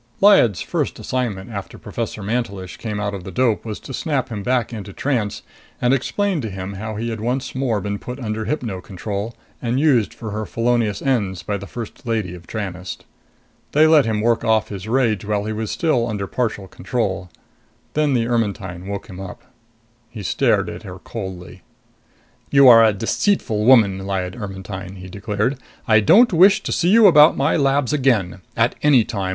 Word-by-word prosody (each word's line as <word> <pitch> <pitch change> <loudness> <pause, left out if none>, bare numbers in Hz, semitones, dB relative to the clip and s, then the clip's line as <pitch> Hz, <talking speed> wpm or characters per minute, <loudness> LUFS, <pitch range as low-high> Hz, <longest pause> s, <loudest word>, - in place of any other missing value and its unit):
Lyad's 195 - +5
first - - -2
assignment 120 -5 -3
after 100 -3 -7
Professor 105 - -5
Mantelish 100 -4 -3
came 105 -3 -4
out 105 0 -2
of 95 -3 -6
the 95 - -7
dope 115 +2 +1
was 110 -2 -6
to 135 - -9
snap 135 -3 -1
him 105 -3 -5
back 125 +1 0
into 105 -3 -7
trance 115 -7 -2 0.4
and 125 +1 +2
explain 185 +6 0
to 110 - -4
him 95 0 -6
how 110 +2 -5
he 115 +2 -3
had 110 -1 -5
once 125 +3 -2
more 130 -5 0
been 100 +1 -4
put 125 +2 -7
under 110 -3 -3
hypno 115 -10 -3
control 100 +4 -5 0.3
and 120 +1 0
used 135 -8 +3
for 110 -3 -7
her 110 +1 -4
felonious 115 -3 0
ends 105 -9 0
by 105 - -2
the 100 0 -6
First 115 0 -8
Lady 110 -6 -1
of 85 -1 -12
Tranest. 95 -4 -6 0.7
They 155 +2 +6
let 155 -3 +5
him 110 -1 0
work 115 +1 +1
off 110 -2 +2
his 100 0 -7
rage 115 -4 +1
while 105 0 -1
he 110 - -2
was 110 0 -3
still 125 -8 +1
under 105 -3 -3
partial 105 -3 -2
control. 95 -3 -3 0.6
Then 150 -3 +2
the 115 -2 +1
Ermetyne 100 -6 -2
woke 100 -1 -5
him 95 -3 -10
up. 95 -1 -8 0.7
He 110 -3 -8
stared - - +1
at - - -7
her - - -9
coldly. 95 -4 -8 0.9
"You 140 -1 +6
are 115 -2 +9
a 110 - +5
deceitful 110 - 0
woman, 110 -7 +5
Lyad 95 -1 -3
Ermetyne!" 95 -2 -7
he 90 -1 -10
declared. 105 +6 -2 0.3
"I 110 -1 +6
don't 215 - +5
wish 190 +4 +5
to - - -3
see 175 - +1
you 225 +2 +6
about 155 -4 +7
my 140 +3 +2
labs 140 -1 +1
again! 115 -11 +1 0.2
At 115 +2 +3
any 140 -6 +5
time. 100 -5 -3
110 Hz, 185 wpm, -20 LUFS, 100-125 Hz, 0.9 s, are